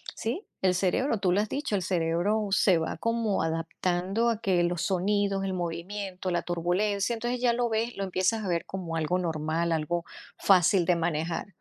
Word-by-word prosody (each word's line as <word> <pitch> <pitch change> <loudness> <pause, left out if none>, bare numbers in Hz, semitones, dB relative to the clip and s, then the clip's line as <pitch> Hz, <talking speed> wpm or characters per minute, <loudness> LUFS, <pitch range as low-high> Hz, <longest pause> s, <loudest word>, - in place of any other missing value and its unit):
sí, 265 - -3 0.2
el 185 -1 +3
cerebro 215 +7 +1
tú 185 -3 +2
lo 205 - +3
has 215 - -3
dicho, 280 -7 -2
el 190 - 0
cerebro 180 +5 0
se 190 -3 +4
va 160 - -3
como 230 -3 0
adaptando 175 +6 0
a 225 -2 -1
que 180 -5 +2
los 175 0 0
sonidos, 195 +1 +1
el 190 - -2
movimiento, 185 +2 -4
la 175 - 0
turbulencia, 195 +6 0
entonces 240 +2 -3
ya 240 -2 +3
lo 240 0 +1
ves, 225 +1 -1
lo 195 - -2
empiezas 190 +4 0
a - - -3
ver 170 -1 0
como 175 -4 -5
algo 160 +3 0
normal, 165 0 -1
algo 165 +2 -1 0.3
fácil 185 -1 +4
de 180 - +3
manejar. 165 +1 -1
185 Hz, 185 wpm, -28 LUFS, 170-210 Hz, 0.3 s, se